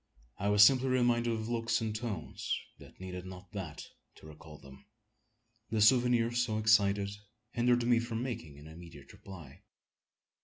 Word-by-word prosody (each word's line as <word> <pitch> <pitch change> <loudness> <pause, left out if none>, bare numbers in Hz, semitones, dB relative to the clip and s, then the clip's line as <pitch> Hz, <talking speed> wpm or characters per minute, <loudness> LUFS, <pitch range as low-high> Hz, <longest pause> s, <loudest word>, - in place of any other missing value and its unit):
I 100 0 -1
was 105 0 +7
simply 130 +4 +5
reminded 120 -2 +2
of 110 -1 -3
looks 115 -1 -1
and 110 -2 -3
tones 110 -8 -4 0.2
that - - -16
needed 90 -1 -7
not 95 0 -11
that 95 -7 -7 0.3
to - - -17
recall 75 0 -13
them. 70 +8 -16 0.8
The 110 0 -1
souvenirs 120 +1 +3
so 110 -3 -2
excited 100 -2 +2 0.4
hindered 120 0 +1
me 120 -1 +3
from 115 0 -4
making 80 - -6
an 75 - -14
immediate 80 -3 -13
reply. 85 -9 -13
110 Hz, 150 wpm, -31 LUFS, 90-120 Hz, 0.8 s, was